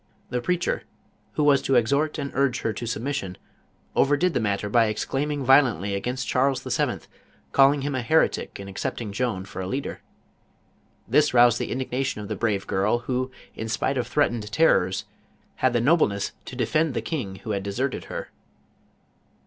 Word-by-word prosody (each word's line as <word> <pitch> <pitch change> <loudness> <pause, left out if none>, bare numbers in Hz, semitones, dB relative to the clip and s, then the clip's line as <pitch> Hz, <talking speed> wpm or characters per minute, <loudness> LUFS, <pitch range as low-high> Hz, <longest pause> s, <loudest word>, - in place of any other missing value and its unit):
The 125 - -1
preacher, 180 +6 0 0.5
who 150 - 0
was 145 -2 +5
to 135 - +1
exhort 140 +6 +2
and 140 -2 -4
urge 135 -2 +1
her 110 - -1
to 120 +3 -5
submission, 115 -5 -3 0.6
overdid 145 +6 +3
the - - +1
mat 100 -3 0
tor 105 - -4
by 115 0 +5
exclaiming 135 +6 -2
violcnlly 120 - +4
against 125 +6 -3
Charles 135 +1 +1
VII., - - -1 0.5
call 135 0 +6
ing 145 -1 -2
him 145 0 -2
a 130 - -1
heretic 155 -1 +1
in 100 - -7
accepting 100 +3 -4
Joan 105 -4 -2
for 95 -1 -7
a 90 - -4
leader. 135 +6 -4 1.1
This 150 +5 +4
.1 120 -1 +6
the - - -3
indignation 130 -2 -2
of 105 0 -7
the 110 - -2
brave 100 -2 -1
girl 100 +5 +1
who, 130 0 -1 0.2
in 110 - -5
spito 135 +4 0
of 125 - -2
threatened 120 -7 0
terrors, 95 - +3 0.5
had 130 - +2
t!ic 120 -1 +1
nobleness 130 - +2
to - - -8
defend 155 -3 +1
the - - 0
king 115 - -3
who 100 +3 -6
had 100 -1 -1
deserted 120 +7 -2
her. - - -6
125 Hz, 175 wpm, -25 LUFS, 105-140 Hz, 1.1 s, call